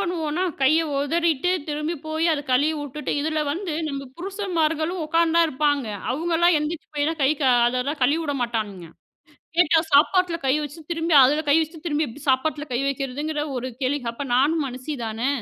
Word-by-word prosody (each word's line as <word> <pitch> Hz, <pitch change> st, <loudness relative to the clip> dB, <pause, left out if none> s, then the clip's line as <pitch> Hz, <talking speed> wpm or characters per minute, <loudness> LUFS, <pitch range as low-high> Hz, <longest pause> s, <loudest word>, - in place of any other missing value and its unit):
பண்ணுவோன்னா 335 Hz, -1 st, -2 dB, 0.2 s
கைய 310 Hz, +5 st, +5 dB, 0.2 s
ஒதறிட்டு 330 Hz, +2 st, +1 dB, 0.2 s
திரும்பிப் 300 Hz, +1 st, -3 dB
போய் 315 Hz, +1 st, 0 dB
அத 295 Hz, -, -1 dB
கழுவி 290 Hz, +5 st, +3 dB
விட்டுட்டு 290 Hz, +1 st, -4 dB
இதுல 310 Hz, +1 st, -1 dB
வந்து 350 Hz, 0 st, -4 dB, 0.2 s
நம்ம 275 Hz, -2 st, -5 dB
புருஷன்மார்களும் 345 Hz, -3 st, -1 dB
உக்காந்தா 335 Hz, +1 st, +3 dB
இருப்பாங்க. 290 Hz, -2 st, 0 dB, 0.3 s
அவுங்கல்லாம் 335 Hz, +3 st, +2 dB
எந்திரிச்சு 315 Hz, +2 st, -4 dB
போய்லாம் 305 Hz, +2 st, -1 dB
கை, 270 Hz, -, +4 dB
கா 260 Hz, -, +4 dB, 0.2 s
அதெல்லாம் 255 Hz, +5 st, -1 dB
கழுவி 295 Hz, +6 st, +2 dB
விடமாட்டானுங்க. 225 Hz, -, -3 dB, 1.1 s
சாப்பாட்டுல 345 Hz, +4 st, +4 dB
கை 260 Hz, -, +3 dB
வச்சி 295 Hz, +3 st, -7 dB
திரும்பி 330 Hz, -1 st, 0 dB
அதுல 295 Hz, +4 st, +3 dB
கை 285 Hz, -, +5 dB
வச்சி 320 Hz, +1 st, -4 dB
திரும்பிச் 295 Hz, -5 st, -1 dB
சாப்பாட்டுல 295 Hz, +3 st, +1 dB
கை 240 Hz, -, 0 dB
வைக்குறதுங்குற 280 Hz, +3 st, -2 dB
ஒரு 255 Hz, +1 st, -3 dB
கேள்வி. 275 Hz, +3 st, 0 dB
அப்ப 280 Hz, +4 st, -6 dB
நானும் 295 Hz, +4 st, +2 dB
மனுஷிதானே! 250 Hz, -2 st, -4 dB
300 Hz, 150 wpm, -23 LUFS, 270-325 Hz, 1.1 s, கைய